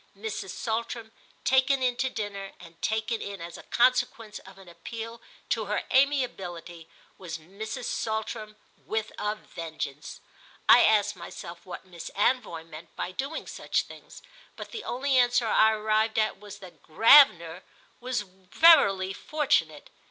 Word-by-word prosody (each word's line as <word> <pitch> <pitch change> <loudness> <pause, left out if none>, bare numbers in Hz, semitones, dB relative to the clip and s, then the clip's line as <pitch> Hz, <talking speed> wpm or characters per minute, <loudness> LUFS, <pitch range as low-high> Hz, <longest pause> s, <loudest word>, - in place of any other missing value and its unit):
Mrs. 215 -2 -5
Saltram 225 +2 -4 0.3
taken 265 0 +3
in 250 -1 +1
to 260 - 0
dinner, 205 -4 -6
and 170 -1 -15
taken 220 +1 -1
in 200 -1 -6
as 170 0 -8
a - - -10
consequence 235 -3 +1
of 190 0 -15
an 195 -1 -15
appeal 225 +7 -8 0.3
to 225 -2 0
her 210 +1 -2
amiability, 190 - 0 0.3
was 170 -4 -6
Mrs. 215 - -7
Saltram 220 -1 -3 0.3
with 220 0 -3
a 210 0 -1
vengeance. 160 -7 -7 0.5
I 245 - +8
asked 205 -1 +3
myself 170 0 -10
what 180 - -8
Miss 175 -3 -9
Anvoy 205 -6 0
meant 155 +1 -12
by 180 - -4
doing 275 +10 -4
such - - -2
things, - - -14 0.3
but - - -9
the 445 -2 -6
only 265 +2 0
answer 245 -1 +3
I 220 0 +4
arrived 215 +1 0
at 215 -3 +1
was 205 0 -10
that 180 -6 -14
Gravener 180 - +6 0.4
was 250 -2 -2
verily 190 - +4
fortunate. 225 - -1
215 Hz, 145 wpm, -27 LUFS, 180-240 Hz, 0.5 s, I